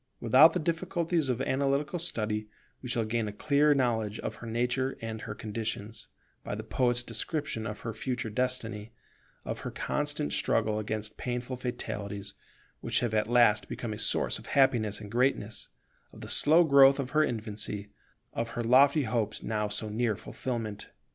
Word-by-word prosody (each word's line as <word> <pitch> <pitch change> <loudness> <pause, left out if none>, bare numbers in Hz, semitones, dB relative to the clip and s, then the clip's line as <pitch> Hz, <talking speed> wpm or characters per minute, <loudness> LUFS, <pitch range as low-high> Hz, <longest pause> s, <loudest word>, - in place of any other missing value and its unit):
Without 130 +8 +7
the 180 - 0
difficulties 170 -2 -1
of 125 -1 0
analytical 140 +5 0
study, 110 -10 -2 0.3
we 125 - -7
shall 115 -2 0
gain 110 0 -1
a - - -3
clear 145 +6 +3
knowledge 110 -5 0
of - - -5
her 120 - -9
nature 125 +3 -1
and 110 -1 -5
her 105 - -6
conditions, 110 0 -5 0.4
by - - -4
the - - -6
poet's 120 -1 +1
description 120 0 -2
of 105 - -6
her 115 - -4
future 125 -1 -3
destiny, 115 -3 -2 0.5
of - - -4
her - - -5
constant 75 - -2
struggle 105 0 +1
against 110 0 -3
painful 125 +1 -3
fatalities, 105 -5 -4 0.5
which - - +1
have 120 -3 -1
at 105 -1 +1
last 120 -3 +4
become 115 -3 -4
a 105 - -7
source - - +1
of - - -13
happiness 120 -6 +3
and 105 -1 -9
greatness, 115 -4 0 0.4
of - - -13
the - - -8
slow 160 +4 +5
growth 140 -3 +7
of 130 -2 -3
her 155 +1 +4
infancy, 105 -4 -3 0.4
of 115 0 -2
her 120 - 0
lofty 140 +5 +5
hopes 115 -2 -1
now 105 -1 -1
so 105 +1 -2
near 110 +1 0
fulfilment. 110 -1 -5
120 Hz, 165 wpm, -29 LUFS, 110-135 Hz, 0.5 s, Without